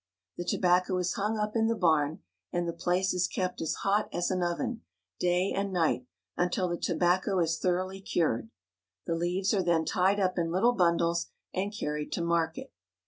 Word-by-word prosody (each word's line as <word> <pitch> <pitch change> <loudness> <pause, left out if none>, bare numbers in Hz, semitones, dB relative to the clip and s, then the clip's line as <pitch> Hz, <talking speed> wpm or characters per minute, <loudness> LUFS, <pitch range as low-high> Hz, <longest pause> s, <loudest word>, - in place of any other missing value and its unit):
The 175 - -4
tobacco 180 +1 +2
is 180 -1 0
hung 210 +2 -1
up 210 +1 -2
in 225 -1 +3
the 230 - +1
barn, 155 -5 +2 0.3
and 175 0 -1
the 170 - -2
place 180 +3 0
is 180 0 +1
kept 185 -1 -3
as 160 - -1
hot 205 +2 +2
as 175 - -1
an 185 -1 0
oven, 175 -1 -2 0.4
day 180 +2 +2
and 195 0 -1
night, 160 -8 +1 0.3
until 180 +1 0
the 175 -1 -3
tobacco 185 +2 +1
is 165 -2 +1
thoroughly 185 +1 -1
cured. 120 - 0 0.6
The 170 - -1
leaves 180 +4 0
are 200 - +2
then 170 -3 +2
tied 195 +2 +2
up 185 -2 +1
in 165 -1 0
little 200 +8 +3
bundles 170 -3 +2 0.3
and 195 +2 -1
carried 150 -7 -3
to 170 - -1
market. 170 +9 -1
180 Hz, 185 wpm, -29 LUFS, 170-190 Hz, 0.6 s, in